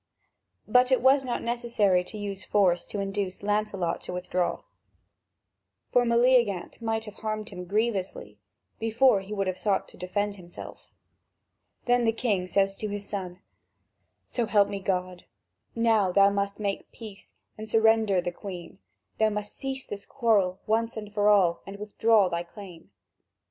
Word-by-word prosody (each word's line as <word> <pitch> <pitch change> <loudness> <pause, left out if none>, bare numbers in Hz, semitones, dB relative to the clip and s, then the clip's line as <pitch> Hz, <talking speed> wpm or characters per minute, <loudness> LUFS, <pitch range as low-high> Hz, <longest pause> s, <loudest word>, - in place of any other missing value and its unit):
But 250 +1 +4
it 260 - +5
was 265 +2 +4
not 250 -2 -3
necessary 230 -6 +1
to 215 - -8
use 200 -2 -5
force 180 -4 +2
to 205 - -4
induce 195 -1 -3
Lancelot 205 -4 -1
to - - -7
withdraw, 180 0 -2 1.3
for 245 0 +4
Meleagant 235 -5 +2
might 225 -1 -1
have 210 - -9
harmed 215 -1 -4
him 180 -2 -8
grievously, 205 0 -2 0.4
before 225 -1 +3
he 195 +2 -12
would 200 -2 -1
have 185 -1 -3
sought 200 -2 0
to - - -15
defend 205 +3 -2
himself. 175 -2 -11 1.0
Then 245 0 +3
the 225 - +3
king 215 -6 -1
says 195 +1 +1
to 215 - -4
his 205 0 -5
son: 185 -3 -5 0.8
"So 235 -3 -2
help 205 -2 +4
me 200 - -4
God, 185 -2 -3 0.5
now 225 -5 +3
thou 200 +2 +5
must 200 0 -2
make 200 -2 -3
peace 215 -4 -12 0.2
and 215 0 -8
surrender 220 -4 +3
the 175 - -3
Queen. 180 0 -9 0.4
Thou 220 0 +4
must 210 0 -5
cease 270 -1 -4
this 200 -1 -8
quarrel 205 -7 +1
once 225 +1 0 0.2
for 205 0 +3
all 185 -5 +4
and 195 +1 -7
withdraw 210 0 +3
thy 170 -1 -2
claim." 175 -1 -12
205 Hz, 155 wpm, -27 LUFS, 190-225 Hz, 1.3 s, it